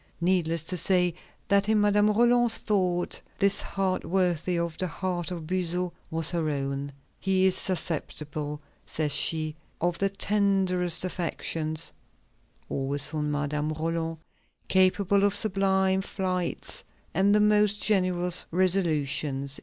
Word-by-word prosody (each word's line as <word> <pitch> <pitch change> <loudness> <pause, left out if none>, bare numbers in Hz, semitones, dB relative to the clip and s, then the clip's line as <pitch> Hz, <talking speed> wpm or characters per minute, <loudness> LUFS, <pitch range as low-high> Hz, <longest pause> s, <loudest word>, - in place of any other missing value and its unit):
Needless 170 -2 +1
to 180 +2 -3
say 180 -1 +3 0.3
that 200 +1 +2
in 220 -1 +3
Madame 205 0 +3
Roland's 240 +1 +4
thought, 180 -4 -1 0.2
this 200 -1 +2
heart 190 -1 -2
worthy 180 -1 0
of 170 -1 -2
the 185 - 0
heart 175 -1 -3
of 170 -3 -6
Buzot 180 0 -2 0.2
was 165 -1 +2
her 165 -3 -1
own. 140 0 -3 0.3
"He 190 -1 +2
is 190 - +4
susceptible," 150 -4 -2 0.2
says 155 -2 -2
she, 155 +1 +1 0.2
"of 175 0 -1
the 195 - +2
tenderest 195 -3 0
affections" 165 -3 -3 0.8
(always 140 +1 0
for 155 0 -3
Madame 150 +1 -2
Roland), 165 +1 -3 0.5
"capable 190 +1 +3
of 205 0 +2
sublime 190 -2 +2
flights 185 - -3 0.3
and 200 +2 +3
the - - +4
most 210 0 +3
generous 180 -3 +2
resolutions." 150 -6 +1
180 Hz, 125 wpm, -27 LUFS, 160-195 Hz, 0.8 s, Roland's